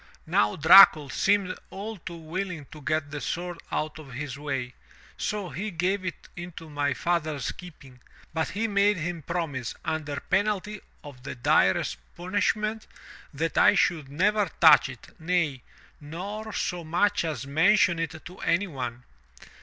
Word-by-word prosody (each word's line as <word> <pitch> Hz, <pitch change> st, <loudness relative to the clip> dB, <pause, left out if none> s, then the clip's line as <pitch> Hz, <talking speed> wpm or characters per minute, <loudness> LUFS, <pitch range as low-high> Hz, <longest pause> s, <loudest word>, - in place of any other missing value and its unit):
Now 105 Hz, 0 st, +2 dB
Dracul 155 Hz, -3 st, +8 dB
seemed 195 Hz, -2 st, +1 dB
all 215 Hz, +3 st, -6 dB
too 170 Hz, -1 st, -8 dB
willing 170 Hz, -1 st, -5 dB
to 155 Hz, -, -11 dB
get 155 Hz, 0 st, -1 dB
the 145 Hz, -1 st, -5 dB
sword 175 Hz, 0 st, -4 dB
out 155 Hz, +1 st, -2 dB
of 140 Hz, -4 st, -11 dB
his 140 Hz, +1 st, -5 dB
way, 135 Hz, -3 st, -4 dB, 0.4 s
so 205 Hz, -4 st, -3 dB
he 210 Hz, +6 st, -4 dB
gave 185 Hz, +2 st, -1 dB
it 180 Hz, -2 st, -6 dB
into 175 Hz, -3 st, -9 dB
my 145 Hz, -1 st, 0 dB
father's 155 Hz, -6 st, -1 dB
keeping, 145 Hz, -8 st, -13 dB, 0.3 s
but 160 Hz, 0 st, 0 dB
he 220 Hz, +3 st, -1 dB
made 205 Hz, 0 st, +3 dB
him 170 Hz, +1 st, -4 dB
promise, 145 Hz, -7 st, -3 dB
under 150 Hz, -3 st, -2 dB
penalty 210 Hz, 0 st, -1 dB, 0.2 s
of 140 Hz, -4 st, -11 dB
the 135 Hz, -, -7 dB
direst 120 Hz, -, +2 dB, 0.2 s
punishment, 210 Hz, +4 st, -1 dB, 0.4 s
that 160 Hz, +3 st, -1 dB
I -, -, +6 dB
should 155 Hz, -6 st, +1 dB
never 200 Hz, +7 st, +1 dB
touch 160 Hz, -5 st, +7 dB
it, 125 Hz, -4 st, -11 dB
nay, 160 Hz, -5 st, 0 dB, 0.4 s
nor 200 Hz, +9 st, -6 dB
so 180 Hz, -4 st, -3 dB
much 180 Hz, +6 st, +1 dB
as 150 Hz, -6 st, -3 dB
mention 170 Hz, +4 st, +3 dB
it 160 Hz, -1 st, -4 dB
to 180 Hz, +1 st, -11 dB
anyone. 135 Hz, -9 st, -2 dB
165 Hz, 145 wpm, -27 LUFS, 145-190 Hz, 0.4 s, Dracul